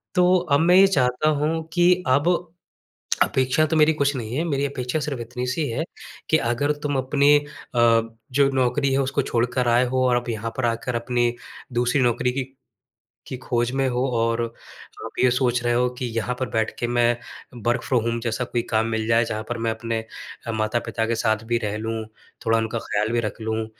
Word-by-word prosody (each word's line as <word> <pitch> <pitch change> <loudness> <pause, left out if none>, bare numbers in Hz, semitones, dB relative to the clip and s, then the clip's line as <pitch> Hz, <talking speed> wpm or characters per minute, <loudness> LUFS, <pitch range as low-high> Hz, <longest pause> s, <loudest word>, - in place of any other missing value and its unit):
तो 180 +1 +5 0.2
अब 140 - +5
मैं 175 +2 +4
ये 195 +1 +8
चाहता 130 -3 +2
हूँ 160 +2 0
कि 175 +1 +5 0.2
अब 140 +5 +3 1.0
अपेक्षा 130 +4 +1
तो 160 +1 -1
मेरी 155 +1 +5
कुछ 140 -1 0
नहीं 120 -1 -4
है, 160 - +1
मेरी 140 -4 0
अपेक्षा 135 +1 -2
सिर्फ 145 -4 -3
इतनी-सी 125 +5 -3
है 120 +7 -2 0.5
कि 160 - +5
अगर 120 +4 0
तुम 145 -1 -1
अपनी 140 +2 +4 0.4
अ, 115 -1 +5 0.3
जो 140 +1 +3
नौकरी 135 +2 +1
है, 135 - +2
उसको 140 +1 0
छोड़ 120 -2 0
कर 125 -1 +1
आए 120 +2 +4
हो 130 +1 +1
और 125 - +3
अब 120 0 -2
यहाँ 115 0 -3
पर 130 - 0
आकर 115 +1 -1
अपनी 120 0 0 0.4
दूसरी 120 +3 +1
नौकरी 125 0 +1
की 135 +1 -2 0.9
की 130 - -4
खोज 120 -2 0
में 135 0 +1
हो 125 +1 0
और 115 +1 +1 0.6
आप - - -9
ये 125 - +5
सोच 125 -1 +1
रहे 120 0 +1
हो 125 +1 +2
कि 125 - -2
यहाँ 115 +2 -1
पर 130 - -1
बैठ 110 -1 0
के 120 - -1
मैं 120 0 +2 0.5
वर्क़ 120 0 +1
फ्रॉम 125 -4 +2
होम 115 0 -1
जैसा 115 +1 -2
कोई 120 -1 -2
काम 110 0 +2
मिल 110 -1 -2
जाए, 115 +1 +3
जहाँ 110 -1 -3
पर 120 - -2
मैं 115 0 0
अपने 115 0 -3 0.5
अ, 115 - -2
माता-पिता 110 +1 -1
के 115 - 0
साथ 110 0 +1
भी 120 - +3
रह 105 0 -2
लूँ, 110 0 -3 0.4
थोड़ा 115 0 +3
उनका 110 +1 -2
ख्याल 105 -1 -1
भी 120 - +2
रख 110 0 -5
लूँ, 110 0 -2
120 Hz, 205 wpm, -23 LUFS, 115-135 Hz, 1.0 s, ये